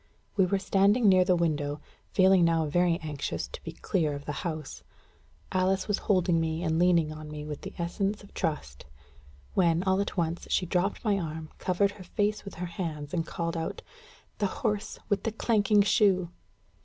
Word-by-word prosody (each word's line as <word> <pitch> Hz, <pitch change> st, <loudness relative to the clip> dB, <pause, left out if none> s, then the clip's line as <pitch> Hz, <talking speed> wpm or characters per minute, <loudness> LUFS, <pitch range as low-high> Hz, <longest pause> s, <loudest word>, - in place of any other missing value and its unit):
We 190 Hz, -3 st, +4 dB
were 195 Hz, -, +1 dB
standing 200 Hz, +4 st, +3 dB
near 185 Hz, -2 st, +6 dB
the 180 Hz, 0 st, +3 dB
window, 150 Hz, -4 st, 0 dB, 0.3 s
feeling 190 Hz, -2 st, +5 dB
now 165 Hz, -1 st, +3 dB
very 170 Hz, +2 st, +2 dB
anxious 150 Hz, -3 st, -3 dB
to -, -, -9 dB
be -, -, -6 dB
clear 155 Hz, -6 st, 0 dB
of 140 Hz, -, -8 dB
the -, -, -3 dB
house; 155 Hz, -4 st, -5 dB, 0.7 s
Alice 185 Hz, +1 st, +1 dB
was 205 Hz, -, 0 dB
holding 180 Hz, -4 st, +3 dB
me 160 Hz, +1 st, -2 dB
and 160 Hz, -1 st, +1 dB
leaning 170 Hz, -3 st, +3 dB
on 155 Hz, 0 st, -9 dB
me 150 Hz, 0 st, -6 dB
with 150 Hz, -1 st, -6 dB
the -, -, -8 dB
essence 195 Hz, +4 st, -2 dB
of 200 Hz, -, -16 dB
trust; 70 Hz, -, -3 dB, 0.7 s
when, 170 Hz, -1 st, +3 dB
all 190 Hz, 0 st, +2 dB
at 200 Hz, -, -4 dB
once, 170 Hz, 0 st, -1 dB
she 180 Hz, -, +1 dB
dropped 180 Hz, +6 st, -1 dB
my 205 Hz, -2 st, +2 dB
arm, 160 Hz, -2 st, -5 dB
covered 195 Hz, +2 st, +1 dB
her 200 Hz, -2 st, -12 dB
face 210 Hz, +3 st, -1 dB
with 200 Hz, -, -9 dB
her 180 Hz, -, -4 dB
hands, 165 Hz, -4 st, -5 dB
and 165 Hz, -2 st, -1 dB
called 170 Hz, 0 st, -3 dB
out: 165 Hz, -1 st, -4 dB, 0.6 s
"The 205 Hz, -, +2 dB, 0.2 s
horse 210 Hz, -1 st, -1 dB
with 205 Hz, -2 st, +1 dB
the 225 Hz, -, -2 dB
clanking 210 Hz, -2 st, +3 dB
shoe!" 190 Hz, -5 st, +3 dB
180 Hz, 185 wpm, -28 LUFS, 160-195 Hz, 0.7 s, near